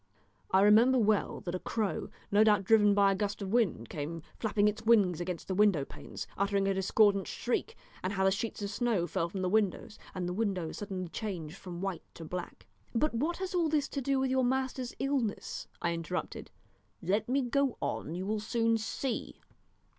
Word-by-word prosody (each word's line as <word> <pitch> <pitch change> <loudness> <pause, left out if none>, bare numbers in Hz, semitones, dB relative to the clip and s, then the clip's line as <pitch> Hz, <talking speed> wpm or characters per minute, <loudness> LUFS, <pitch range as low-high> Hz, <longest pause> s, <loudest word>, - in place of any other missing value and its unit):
I 190 - +4
remember 225 +6 +6
well 215 -3 +1
that 175 - -4
a 185 - -2
crow, 215 -1 -2 0.2
no 205 +2 +6
doubt 210 -2 +4
driven 210 0 +5
by 200 -1 +5
a - - +1
gust 205 +1 -2
of 190 - -4
wind, 195 - +1
came 160 +4 -5 0.2
flapping 210 -2 +2
its 210 +1 -1
wings 205 -7 +4
against 175 -1 -4
the 190 - -1
window 190 -7 +3
panes, - - -8
uttering 200 0 +1
a 195 - +2
discordant 195 +1 +3
shriek, 425 - -2 0.2
and 185 +2 -2
how 190 -1 0
the 190 - +4
sheets 210 +1 -3
of 200 - -3
snow 215 -4 +1
fell 170 0 -1
from 190 +1 -4
the - - +1
windows, 210 +1 0 0.2
and 180 -1 -2
the 180 - -2
windows 190 -5 -2
suddenly 190 -3 -4
changed 175 -6 -5
from 175 -2 -8
white 190 -4 -3
to 165 - -8
black 180 +2 -6
" - - -33
"But 300 +5 +2
what 305 +9 -1
has 375 0 -4
all 340 -3 +2
this 295 -2 +1
to 275 - -3
do 275 +1 +1
with 265 -1 0
your 260 0 +2
master's 260 0 -1
illness?" 270 -6 -2 0.2
I 170 - +1
interrupted. 170 +2 -4 0.5
"Let 205 +6 0
me 270 +1 +2
go 265 +1 +1
on 160 - -3
you 185 +1 -3
will 215 +1 -1
soon 230 +1 +1
see. 240 +3 -3
205 Hz, 200 wpm, -31 LUFS, 185-235 Hz, 0.5 s, remember